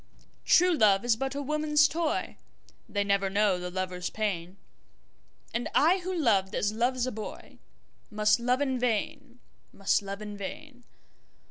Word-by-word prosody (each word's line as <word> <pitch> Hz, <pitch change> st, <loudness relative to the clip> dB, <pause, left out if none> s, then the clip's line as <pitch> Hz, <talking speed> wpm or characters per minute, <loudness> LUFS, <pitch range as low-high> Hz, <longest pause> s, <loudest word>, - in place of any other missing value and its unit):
True 360 Hz, +1 st, +5 dB
love 210 Hz, -7 st, +3 dB
is 240 Hz, -2 st, +3 dB
but 270 Hz, +3 st, -3 dB
a 285 Hz, -, -3 dB
woman's 300 Hz, +1 st, +3 dB
toy, 325 Hz, 0 st, -2 dB, 0.5 s
They 205 Hz, -1 st, 0 dB
never 200 Hz, -1 st, +1 dB
know 200 Hz, -2 st, +2 dB
the 180 Hz, 0 st, -5 dB
lover's 180 Hz, -1 st, -3 dB
pain, 190 Hz, -4 st, -3 dB, 1.0 s
And 235 Hz, +2 st, -2 dB
I 340 Hz, +6 st, +4 dB
who 370 Hz, +1 st, -5 dB
loved 205 Hz, -, +1 dB
as 205 Hz, +1 st, 0 dB
loves 245 Hz, +2 st, 0 dB
a 255 Hz, -, -3 dB
boyMust 215 Hz, 0 st, -4 dB
love 250 Hz, +3 st, +1 dB
in 265 Hz, -3 st, 0 dB
vain, 250 Hz, +2 st, -2 dB, 0.3 s
must 195 Hz, +1 st, +1 dB
love 200 Hz, 0 st, -6 dB
in 210 Hz, -1 st, -7 dB
vain. 245 Hz, +5 st, -8 dB
230 Hz, 145 wpm, -28 LUFS, 200-280 Hz, 1.0 s, True